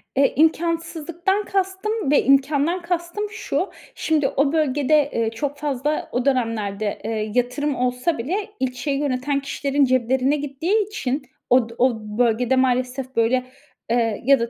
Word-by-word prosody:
Eee, 275 0 +3
imkânsızlıktan 335 +4 0
kastım 385 -1 -1
ve 290 - +4
imkândan 285 +6 +2
kastım 345 +4 -3
şu. 440 - -2 0.3
Şimdi 305 -4 +1
o 280 +3 +1
bölgede, 295 -1 +2
eee, 230 -1 +1
çok 285 +5 -3
fazla 295 0 -2
o 245 +2 -1
dönemlerde, 215 -6 -1
eee, 215 -1 -2
yatırım 255 +4 0
olsa 250 +6 0
bile 385 - -2
ilçeyi 260 +2 -1
yöneten 280 0 0
kişilerin 280 0 0
ceplerine 255 +2 +2
gittiği 320 +9 0
için 280 -9 -2 0.3
od 245 -2 +4
o 255 +1 +4 0.3
bölgede 245 +2 +2
maalesef 255 0 0
böyle, 245 +3 +2 0.4
eee, 230 -3 +1
ya 275 -2 +6
da 235 0 -1
275 Hz, 135 wpm, -22 LUFS, 250-315 Hz, 0.4 s, ya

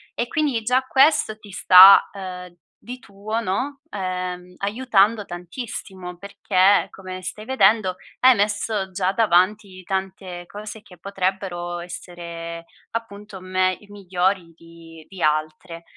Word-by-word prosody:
e 235 - -2
quindi 280 -8 -1
già 250 +3 +2
questo 265 -4 +3
ti 205 -2 -15
sta, 190 +2 +8
uhm, 180 -2 -8 0.3
di 250 +1 -8
tuo, 210 +2 -5
no, 255 +8 -3
ehm, 180 -2 -5
aiutando 210 0 +1
tantissimo, 180 -1 -8
perché, 200 0 +2
come 185 -1 -9
stai 210 +3 -6
vedendo, 215 -6 +3 0.2
hai 255 -1 +6
messo 205 -1 -1
già 185 +1 -1
davanti 195 -1 +1
tante 190 -1 -5
cose 210 +1 -9
che 180 -4 -17
potrebbero 185 -2 -3
essere, 170 -1 -8 0.3
appunto, 210 -3 -7
me 185 0 0
i 210 - -19
migliori 185 -2 -2
di 165 -1 -15
di 190 -2 -11
altre. 155 +3 -2
190 Hz, 125 wpm, -22 LUFS, 180-210 Hz, 0.3 s, sta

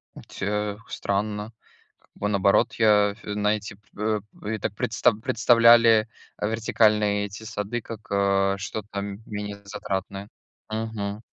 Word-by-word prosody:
Э, - - -10
ть - - -11
э, 105 +1 -1
странно. 105 +2 -2 0.5
Как - - -33
бы 105 - -2
наоборот 100 -1 +3
я, 105 -2 +4
а, - - -12
фь 105 -1 -7
знаете, 105 +1 -1
эп 100 - -30 0.2
э, 105 -1 0 0.3
я 110 - -3
так 100 - -2
предста 120 +1 +2
представляли, 115 0 +5 0.3
а, 105 - -1
вертикальные 105 -2 +2
эти 100 +2 -10
сады 110 +2 -4
как, 115 +1 -9
э, 100 -1 +2
что-то, 100 +1 -5
м 100 +1 -6
менее 105 -1 -6
затратное. 100 -1 -5 0.4
Мгм. 110 -2 -3
105 Hz, 150 wpm, -25 LUFS, 100-110 Hz, 0.5 s, представляли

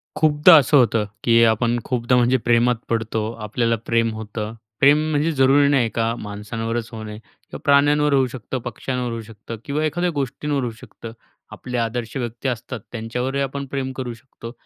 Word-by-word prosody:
खूपदा 155 +2 +6
असं 145 0 +4
होतं 115 -4 +3 0.2
की 115 -1 +5
आपण 115 +1 +2
खूपदा, 125 0 0
म्हणजे 125 +1 +3
प्रेमात 120 0 +2
पडतो, 110 -1 -1
आपल्याला 115 +2 0
प्रेम 115 -1 +1
होतं. 110 0 -5 0.3
प्रेम 140 +2 +6
म्हणजे 150 +2 +1
जरूरी 140 0 +4
नाही 130 -5 +2
का 115 0 +1
माणसांवरच 115 +2 -5
होणे. 110 -1 -7
किंवा 110 - -13
प्राण्यांवर 145 +1 +4
होऊ 135 -2 +3
शकतं, 130 +1 -6
पक्ष्यांवर 125 0 -3
होऊ 115 0 -4
शकतं 110 +1 -9
किंवा 150 +2 -1
एखाद्या 175 +4 0
गोष्टींवर 140 +1 -2
होऊ 120 - -2
शकतं. 115 - -10 0.4
आपले 125 -1 -6
आदर्श 115 0 -3
व्यक्ती 120 0 -4
असतात, 120 0 -5
त्यांच्यावरही 125 +4 -3
आपण 140 +1 -4
प्रेम 135 -1 -2
करू 125 -2 -4
शकतो. 115 -1 -11
120 Hz, 165 wpm, -21 LUFS, 115-135 Hz, 0.4 s, खूपदा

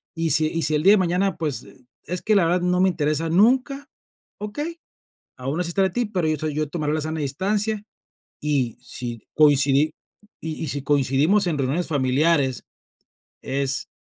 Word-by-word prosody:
Y 165 -1 -1
si 155 0 +5
y 165 +1 -3
si 155 - +3
el 150 - 0
día 195 +3 +7
de - - +5
mañana, 185 +1 0
pues 155 -5 -2 0.4
es 180 +1 -3
que 215 - +1
la 195 -4 +4
verdad 175 +2 +1
no 180 0 +1
me 190 - +4
interesa 155 -1 -1
nunca, 260 - +2 0.5
okey. 295 +11 -5 0.6
Aun 135 +6 -4
así 175 -1 0
estaré 190 +2 +1
para - - -17
ti, 245 +3 0
pero 180 -6 -1
yo 155 - 0
soy 155 +1 -3
yo 155 -1 -2
tomaré 150 -2 -2
la 155 - -1
sana 155 +1 -3
distancia, 200 +9 -1 0.6
y 140 -6 -1
si 120 -2 -4
coincidi 145 0 +4 0.5
y 160 -1 -5
y - - -3
si 140 +1 -2
coincidimos 145 +8 +2
en 160 -4 -1
reuniones 140 +6 -1
familiares, 140 -1 +1 0.8
es 135 0 -1
160 Hz, 180 wpm, -22 LUFS, 145-185 Hz, 0.8 s, día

